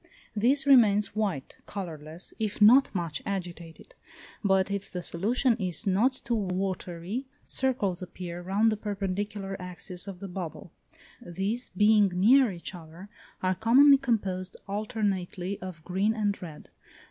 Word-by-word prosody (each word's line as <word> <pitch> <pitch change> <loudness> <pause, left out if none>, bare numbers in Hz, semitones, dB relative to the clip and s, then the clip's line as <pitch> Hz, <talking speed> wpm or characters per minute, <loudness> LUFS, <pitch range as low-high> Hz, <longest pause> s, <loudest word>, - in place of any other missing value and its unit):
This 265 +6 +3
remains 215 -8 +5
white 195 -11 -2
(colourless) 165 -3 -6
if 215 -2 -2
not 240 +6 +7
much 165 -4 -3
agitated; 175 - -6 0.5
but 195 -1 +2
if 200 0 -3
the 180 -1 -5
solution 230 +9 +2
is 185 0 0
not 225 +7 +1
too 235 - -2
watery, 190 +2 -3 0.2
circles 215 -9 +1
appear 175 -1 -7
round 200 +5 +2
the 215 - -2
perpendicular 200 -1 -4
axis 180 +1 -7
of 190 -3 -7
the 200 - -6
bubble; 175 -3 -7 0.5
these 195 +8 -3
being 210 0 +5
near 240 +6 +5
each 175 +1 -6
other, 170 +3 -11 0.3
are 185 0 +2
commonly 265 +8 +6
composed 195 -8 -2
alternately 200 -3 -3
of 180 -3 -8
green 195 +5 0
and 205 -2 -1
red. 160 -4 -10
195 Hz, 135 wpm, -28 LUFS, 180-215 Hz, 0.5 s, not